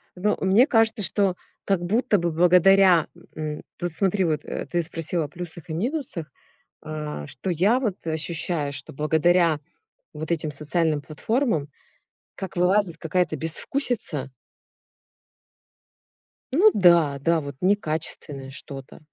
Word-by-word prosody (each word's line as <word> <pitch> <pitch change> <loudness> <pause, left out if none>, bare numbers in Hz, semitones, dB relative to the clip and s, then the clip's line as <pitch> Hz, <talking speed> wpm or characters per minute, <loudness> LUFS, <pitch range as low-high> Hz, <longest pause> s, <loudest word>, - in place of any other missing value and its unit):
Ну, 205 +4 0
мне 200 +9 +5
кажется, 225 -3 +2
что 195 -1 +1 0.3
как 195 -3 +1
будто 210 +3 +2
бы 170 -1 -1
благодаря, 180 +1 +5 0.3
м 155 -1 -4 0.2
вот 175 -2 -2
смотри, 190 +2 +1
вот, 155 -2 0
э, - - -4
ты 175 -1 -1
спросила 165 0 -2
о - - -6
плюсах 170 +1 -9
и 155 - -3
минусах, 215 - -3 0.5
а, 150 - -5
что 155 +9 -6
я 200 +10 +3
вот, 215 -8 -1
э, 160 - -1
ощущаю, 155 -2 -2
что 135 0 -7
благодаря 160 +2 +2 0.6
вот 155 +2 -6
этим 155 -2 -2
социальным 155 +1 0
платформам, 160 - -1 0.7
как 190 - -7
вылазит 180 0 +2
какая-то 170 0 0
безвкусица 160 - -1 2.2
Ну 405 +9 +6
да, 170 -7 +4
да, 165 +3 +2
вот 140 -1 -7
некачественное 155 -7 -1
что-то. 140 0 -8
170 Hz, 130 wpm, -24 LUFS, 155-195 Hz, 2.2 s, Ну